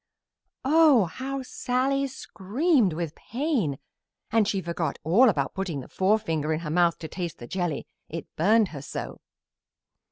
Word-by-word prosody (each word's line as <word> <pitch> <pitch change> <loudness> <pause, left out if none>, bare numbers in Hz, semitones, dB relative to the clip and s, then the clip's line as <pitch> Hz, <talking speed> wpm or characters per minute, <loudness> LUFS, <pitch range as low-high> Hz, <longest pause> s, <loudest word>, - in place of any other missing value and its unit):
Oh, 295 - +6
how 265 +9 -5
Sallie 265 +2 0
screamed 250 - +1
with 165 -1 -3
pain! 240 - -1 0.5
And 220 -2 +3
she 200 -2 0
forgot 170 -2 -3
all 205 - +5
about 140 -8 -1
putting 180 -7 -3
the - - -11
forefinger 185 -6 +1
in 155 +1 -1
her 155 -3 -4
mouth 170 0 +3
to 160 - -7
taste 175 +1 -5
the 120 - -9
jelly, 175 0 -2 0.2
it 165 0 -5
burned 210 +4 +4
her 145 -4 -7
so. 145 - -6
190 Hz, 150 wpm, -26 LUFS, 165-255 Hz, 0.5 s, Oh